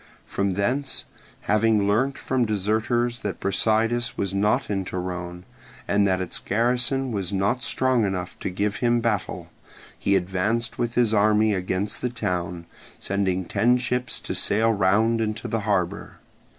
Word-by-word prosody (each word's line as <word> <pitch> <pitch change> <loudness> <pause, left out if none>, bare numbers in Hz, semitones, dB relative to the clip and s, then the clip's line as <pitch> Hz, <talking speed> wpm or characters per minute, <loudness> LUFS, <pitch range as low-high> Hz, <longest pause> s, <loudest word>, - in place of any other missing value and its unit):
From 100 -1 -1
thence, 130 +8 -1 0.4
having 105 -1 +2
learnt 125 +7 +1
from 130 -1 0
deserters 110 +3 0
that 100 -4 -4
Brasidas 110 +4 +1
was 100 -1 -1
not 105 +7 +1
in 100 -2 -1
Torone, 90 -1 -5 0.4
and 100 0 +3
that 95 -1 +1
its 95 -2 -4
garrison 125 +4 0
was 100 -5 -1
not 100 +6 0
strong 130 -2 +1
enough 95 -3 -2
to - - -3
give 100 +3 -1
him 120 -1 +2
battle, 110 -5 -2 0.5
he 100 - +2
advanced 95 +6 -1
with 120 0 -1
his 120 -3 +3
army 105 0 +4
against 95 +2 -2
the 125 - 0
town, 90 -7 -3 0.3
sending 95 -2 -1
ten 120 +7 +3
ships 125 0 -2
to - - -4
sail 110 +2 +2
round 110 +4 +2
into 110 -1 -2
the 115 - -1
harbour. 100 0 -1
105 Hz, 150 wpm, -24 LUFS, 95-120 Hz, 0.5 s, army